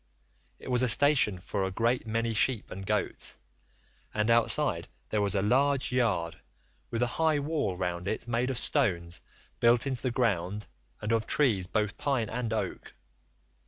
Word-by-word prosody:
It - - -8
was 125 0 +2
a 125 - +2
station 130 -6 +5
for 95 +2 -3
a 95 - -1
great 115 +5 0
many 115 +1 -1
sheep 115 +1 +1
and 95 0 -7
goats, - - -2 0.8
and 105 +2 +1
outside 115 0 +2 0.2
there 105 - 0
was 100 -1 -1
a 95 - +1
large 135 +5 +2
yard, 100 -10 0 0.5
with 115 +1 -1
a 120 +6 -3
high 160 -2 +3
wall 145 - -1
round 90 0 -3
it 110 +3 -3
made 120 +2 0
of 130 - -2
stones 85 - 0 0.4
built 120 +2 +4
into 130 -3 -2
the 130 - 0
ground 105 -5 -1 0.4
and 105 - -2
of 115 -1 +1
trees 110 -11 +2
both 105 +1 -1
pine 130 -6 -1
and 115 -1 -3
oak. 105 -5 -4
115 Hz, 165 wpm, -29 LUFS, 100-125 Hz, 0.8 s, station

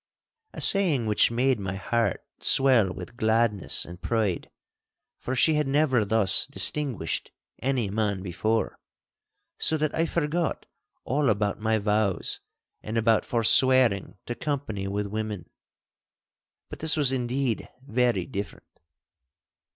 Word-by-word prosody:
A - - -7
saying 170 - +3
which 105 -1 +3
made 125 +1 +1
my 95 -1 -4
heart 115 +4 -1
swell 125 -8 +3
with 95 +6 -9
gladness 110 -4 +1
and 85 +1 -11
pride, 110 -7 -1 0.7
for 130 - -4
she 160 +5 +3
had 150 -2 0
never 135 -4 +2
thus 105 -2 +3
distinguished 130 - 0 0.3
any 130 -4 0
man 100 -3 -1
before, 110 +5 -2 0.8
so 160 - +1
that 155 -1 -1
I 165 +1 0
forgot 165 0 -2 0.4
all 140 +1 0
about 105 -1 0
my 110 +1 +1
vows 105 -2 -1 0.4
and 110 +2 -4
about 115 -1 +2
forswearing 120 -3 +3
to 120 - -3
company 120 -9 -4
with 100 +1 -2
women. 105 -2 -5 1.2
But - - -10
this 160 0 +1
was 140 -4 +3
indeed 125 -1 -2 0.2
very 125 -2 0
different. 100 -6 -6
115 Hz, 125 wpm, -26 LUFS, 105-135 Hz, 1.2 s, saying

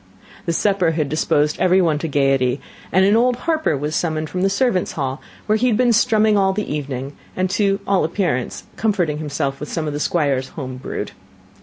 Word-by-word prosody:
The 170 - +1
supper 185 -2 +2
had 155 -3 -1
disposed 150 0 +1
every 185 +1 +4
one 160 -5 +2
to 165 - -3
gaiety, 135 -3 +1 0.3
and 190 +1 +4
an 205 +2 +4
old 245 +2 +3
harper 315 - +1
was 150 +3 -3
summoned 155 -2 -1
from 180 - -2
the 195 - +3
servants' 200 -2 +1
hall, 135 -2 -3 0.2
where 215 0 +2
he 250 - +2
had 225 -4 +2
been 245 -1 +3
strumming 215 -1 +3
all 190 -1 +2
the 210 -5 -3
evening, 140 -1 -4 0.2
and 185 0 0
to 195 0 +1
all 195 -1 +2
appearance 160 -6 -1
comforting 180 -9 0
himself 140 -2 -2
with 150 - -6
some 160 - -2
of 150 - -3
the 145 - -3
Squire's 140 -5 0
home 130 -3 -5
brewed. 130 - -5
165 Hz, 200 wpm, -20 LUFS, 145-200 Hz, 0.3 s, every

